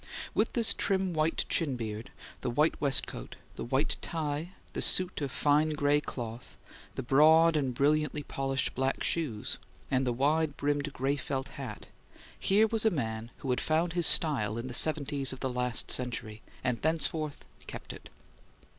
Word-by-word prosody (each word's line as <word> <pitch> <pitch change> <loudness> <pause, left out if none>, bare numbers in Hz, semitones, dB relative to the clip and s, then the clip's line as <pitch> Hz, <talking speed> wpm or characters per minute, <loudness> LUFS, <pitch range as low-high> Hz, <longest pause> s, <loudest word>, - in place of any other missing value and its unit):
With - - +1
this 230 -3 +3
trim 190 -2 0
white 155 +1 0
chin 145 -6 0
beard, 110 -1 -5 0.3
the - - -2
white 150 +7 +2
waistcoat, 135 - -1 0.2
the - - -5
white 130 +5 0
tie, 160 +2 -3 0.2
the - - -3
suit 185 -3 +4
of 140 - -2
fine 150 +3 +2
gray 145 0 +2
cloth, 120 -3 -7 0.4
the - - -4
broad 160 +5 +5
and 135 -4 0
brilliantly 150 +3 +1
polished 135 -1 -2
black 130 +1 -1
shoes, 135 -11 -2 0.3
and 130 0 +2
the - - +2
wide 145 +4 +1
brimmed 145 0 -1
gray 135 +2 -1
felt 135 0 -3
hat, - - -8 0.5
here 205 +3 +4
was 220 0 0
a 220 - +5
man 115 - -3 0.2
who 130 - 0
had 125 - 0
found 165 +2 0
his 175 -2 +5
style 115 -10 +4
in 115 - -4
the 130 - -6
seventies 140 -2 +2
of 130 - -9
the 130 -2 -2
last 125 -2 -1
century, 115 -3 -1 0.2
and 125 -2 -1
thenceforth 155 -1 -1 0.2
kept - - -7
it. - - -13
145 Hz, 165 wpm, -30 LUFS, 125-160 Hz, 0.5 s, broad